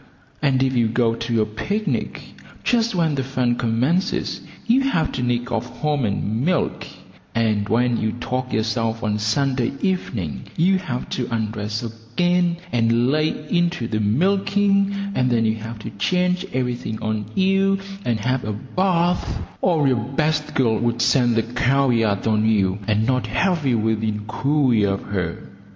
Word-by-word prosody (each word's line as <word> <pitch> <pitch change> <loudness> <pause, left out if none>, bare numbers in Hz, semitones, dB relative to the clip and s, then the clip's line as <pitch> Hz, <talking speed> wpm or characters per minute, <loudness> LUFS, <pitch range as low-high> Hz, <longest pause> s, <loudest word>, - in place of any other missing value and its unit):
And 135 -3 +2
if 130 0 +1
you 120 -3 +3
go 115 0 +1
to 115 -1 0
a - - -2
picnic, 200 - -3 0.4
just 235 -3 +1
when 165 -3 +2
the 135 -2 -1
fun 125 -2 0
commences 130 - 0 0.2
you 240 +4 +4
have 170 - +1
to 130 - -3
nick 120 0 -1
off 115 -1 -1
home 150 -4 0
and 105 +3 -1
milk, 180 +3 0 0.5
and 110 -3 +1
when 120 +2 +2
you 110 -1 0
tog 130 +1 -3
yourself 115 +1 -1
on 105 -1 0
Sunday 125 +4 0
evening 120 - -2
you 185 +3 +3
have 130 -9 -4
to 125 - -2
undress 110 -1 -2
again 170 +11 0
and 120 +1 +2
lay 155 +1 +2 0.2
into 175 -8 +1
the 110 -2 -1
milking, 200 - +1
and 125 -6 +1
then 115 -2 +2
you 110 0 +1
have 110 +1 -7
to 110 +1 -7
change 180 - 0
everything 125 -3 -2
on 110 -1 -1
you 195 +1 +3 0.3
and 115 -6 0
have 130 +3 0
a 105 - -3
bath, 175 - 0 0.2
or 160 -6 +3
your 130 -2 +3
best 150 +4 -1
girl 115 -5 +2
would 120 0 0
scent 120 -1 +3
the 115 - +2
cow 130 +3 +1
yard 110 -5 +1
on 110 -1 +2
you, 100 -3 +2
and 110 0 +2
not 125 -2 0
have 160 - +1
you 120 -3 +3
within 110 -1 0
cooee 130 -1 +2
of 100 -1 0
her. 90 -4 -4
125 Hz, 165 wpm, -22 LUFS, 110-160 Hz, 0.5 s, you